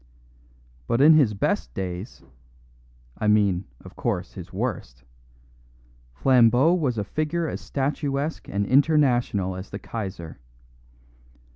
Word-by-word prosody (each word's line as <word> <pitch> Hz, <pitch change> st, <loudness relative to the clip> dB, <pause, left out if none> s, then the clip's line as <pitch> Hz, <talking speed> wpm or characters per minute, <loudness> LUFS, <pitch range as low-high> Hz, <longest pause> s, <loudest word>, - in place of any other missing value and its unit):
But 115 Hz, -, +1 dB
in 150 Hz, +4 st, +7 dB
his 135 Hz, -9 st, +4 dB
best 60 Hz, -9 st, -1 dB
days 95 Hz, +3 st, -6 dB, 1.0 s
(I 105 Hz, -, -1 dB
mean, 100 Hz, -3 st, +2 dB, 0.2 s
of -, -, -12 dB
course, -, -, -3 dB
his -, -, -10 dB
worst) 60 Hz, +1 st, -4 dB, 1.1 s
Flambeau 125 Hz, -, +4 dB
was 145 Hz, -10 st, 0 dB
a 105 Hz, -, -1 dB
figure 155 Hz, -, -2 dB
as -, -, -5 dB
statuesque 140 Hz, +2 st, -3 dB
and 100 Hz, +1 st, -1 dB
international 125 Hz, -, +2 dB
as 95 Hz, +1 st, -8 dB
the 100 Hz, -, -6 dB
Kaiser. 95 Hz, -9 st, -7 dB
115 Hz, 115 wpm, -24 LUFS, 95-145 Hz, 1.1 s, in